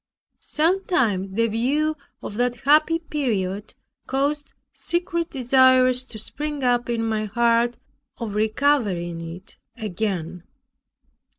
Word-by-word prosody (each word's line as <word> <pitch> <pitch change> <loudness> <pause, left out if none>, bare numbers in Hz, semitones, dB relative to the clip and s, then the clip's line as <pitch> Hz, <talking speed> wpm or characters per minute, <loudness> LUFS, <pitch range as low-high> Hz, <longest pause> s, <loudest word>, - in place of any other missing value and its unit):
Sometimes 300 - 0
the 230 +1 +3
view 275 +8 0 0.3
of - - -5
that 245 0 +1
happy 310 +4 +4
period 220 - -3 0.3
caused 285 +2 -1 0.2
secret 340 -1 -2
desires 255 -1 +4
to 235 - -7
spring 295 +6 -4
up 245 -1 +1
in 230 -1 0
my 215 -1 -1
heart, 235 +2 +2 0.4
of 225 -3 -5
recovering 210 -7 +1
it 185 +2 -15 0.2
again. 185 -5 -3
240 Hz, 105 wpm, -23 LUFS, 215-290 Hz, 0.4 s, happy